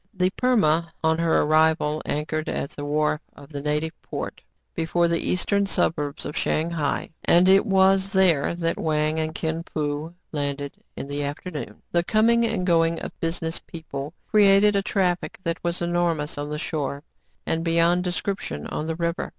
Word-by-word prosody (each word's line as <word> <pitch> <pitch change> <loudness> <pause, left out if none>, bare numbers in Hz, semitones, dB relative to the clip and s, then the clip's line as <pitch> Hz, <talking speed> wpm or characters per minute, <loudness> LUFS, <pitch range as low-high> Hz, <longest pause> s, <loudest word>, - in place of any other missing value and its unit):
" - - -48
The 185 +1 +3
Perma," 170 -10 +2 0.2
on 160 0 +2
her 165 -1 +3
arrival, 155 0 +2
anchored 155 +1 -2
at 140 - -3
the 145 - -7
wharf 150 +1 0
of 140 - -14
the 145 -2 -5
native 150 +2 -1
port, - - -6 0.3
before 170 +1 +1
the 170 0 +1
eastern 200 +2 +1
suburbs 150 -6 -1
of 150 - -5
Shang 160 +2 0
hai; 155 -2 -1
and 175 +2 +5
it 195 +4 +5
was 195 0 +4
there 180 -6 +3
that 165 -1 -1
Wang 155 0 +1
and 155 0 -2
Kin 160 +1 -2
Fo 150 +2 -3 0.2
landed 145 -1 -3 0.2
in - - -5
the 145 +1 -3
afternoon. 145 +3 -6
The 170 0 +2
coming 230 +4 +3
and 210 -5 -1
going 165 -2 +3
of - - -6
business 165 0 -2
people 155 -2 -7 0.2
cre 215 - +4
ated 200 +1 +6
a 200 - +3
traffic 185 -3 0
that 165 -1 -3
was 175 0 -1
enormous 170 -3 0
on 145 0 -4
the 150 - -3
shore, 145 -3 -3 0.4
and 165 0 -1
beyond 170 +1 +3
description 180 - -3
on 155 - -4
the 160 - -2
river. 170 0 -2
165 Hz, 175 wpm, -24 LUFS, 150-180 Hz, 0.4 s, ated